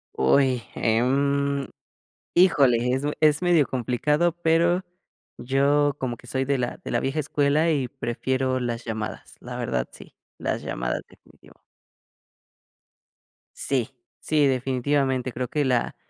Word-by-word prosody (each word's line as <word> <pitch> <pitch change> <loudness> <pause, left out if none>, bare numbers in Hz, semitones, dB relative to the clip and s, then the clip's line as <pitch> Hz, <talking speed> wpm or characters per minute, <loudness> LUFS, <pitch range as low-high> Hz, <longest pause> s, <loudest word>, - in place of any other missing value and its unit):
Uy, 125 - +3
em. 140 +4 +1 0.7
Híjole, 145 -9 +5 0.2
es 130 - 0 0.2
es 150 0 +4
medio 175 -5 +4
complicado, 150 +7 0
pero, 170 +3 +3 0.6
yo 140 +2 +2
como 125 -2 -2
que 120 - -16
soy 130 +1 -1
de 140 -1 0
la 120 - -3
de - - -6
la - - +1
vieja 135 +3 -2
escuela 150 +2 +1
y 135 -5 0
prefiero 130 +2 -2
las 120 -1 -3
llamadas. 110 -1 -5
La - - -7
verdad 65 -1 -2
sí. - - -14 0.2
Las - - -2
llamadas - - -3
definitivo. - - -21 2.0
Sí, 130 -2 -1 0.3
sí, 150 -2 +2
definitivamente, 130 0 0
creo 125 +1 -3
que 150 +4 -1
la 125 -2 0
135 Hz, 125 wpm, -24 LUFS, 125-145 Hz, 2.0 s, Híjole